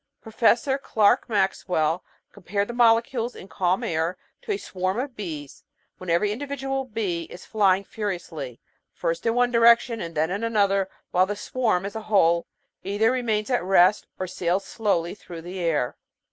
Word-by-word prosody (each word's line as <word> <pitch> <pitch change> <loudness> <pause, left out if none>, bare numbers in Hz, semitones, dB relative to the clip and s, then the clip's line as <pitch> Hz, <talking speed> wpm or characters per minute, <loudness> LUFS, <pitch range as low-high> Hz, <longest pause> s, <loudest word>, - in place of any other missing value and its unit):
Professor 235 +4 +2
Clerk 230 +1 +2
Maxwell 180 -5 0 0.3
com 205 - -15
pared 200 +3 -1
the 240 - -5
molecules 235 +1 +2
in 185 - -10
calm 185 +4 0
air 165 -3 -1 0.2
to - - -5
a 405 - 0
swarm 185 - -3
of 260 -1 -4
bees, 155 -8 -7 0.4
when 185 - -7
every 175 +5 +2
individual 270 +2 -3
bee 200 -8 -2
is 180 - -12
flying 200 -3 +2
furiously, 175 - -5 0.3
first 165 +6 -2
in 230 - +2
one 245 0 +3
direction 235 0 +4
and 165 -1 -6
then 160 +3 +1
in 200 +4 -2
another, 200 -4 +2 0.2
while 185 +1 +3
the 205 - -2
swarm, 215 -4 0
as 200 - -6
a 220 - -3
whole, 170 -5 +3 0.4
either 205 +4 +2
remains 230 -3 -1
at 245 - +2
rest, 185 +2 +4
or 185 - -2
sails 180 +1 -1
slowly 175 -6 -1
through 175 -5 -10
the 180 +2 -6
air. 160 -8 0
200 Hz, 170 wpm, -25 LUFS, 175-230 Hz, 0.4 s, direction